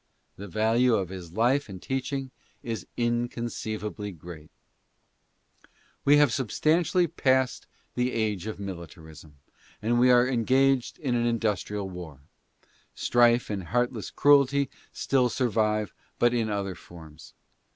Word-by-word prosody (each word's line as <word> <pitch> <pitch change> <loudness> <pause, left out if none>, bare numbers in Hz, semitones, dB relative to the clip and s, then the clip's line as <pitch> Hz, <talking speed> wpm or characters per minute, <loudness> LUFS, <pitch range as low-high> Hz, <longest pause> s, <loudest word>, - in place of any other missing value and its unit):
The 100 - -9
value 115 +5 +2
of 95 -4 -2
this 90 -3 -8
life 120 +7 +1
and 95 -2 -8
teaching 135 +3 -3 0.3
is 115 -7 -5
inconceivably 115 -4 -3
great. 80 -2 -11 1.5
We 145 +1 +6
have 145 -2 +5
subst. 160 - +1
passed 130 -1 +1 0.3
the 125 +1 0
age 105 -5 -1
:t~ - - -3
m 110 - -5
litaris 80 -4 -9
n 75 -2 -18 0.5
a - - -4
but 120 0 +3
we 125 +1 +5
are 125 0 +5
engaged 130 +1 +2
in 135 -5 -2
an 120 0 +1
industrial 105 -3 -1
war. 85 -7 -9 0.7
St:::~e 120 0 +4
and 95 -3 -4
heartless 120 +3 -1
cruelty 140 -1 +3 0.2
still 130 -2 +1
survive, 110 -4 0 0.2
but 120 0 +3
in 115 -2 0
other 100 -2 -2
forms. 80 -3 -14
115 Hz, 130 wpm, -27 LUFS, 95-125 Hz, 1.5 s, We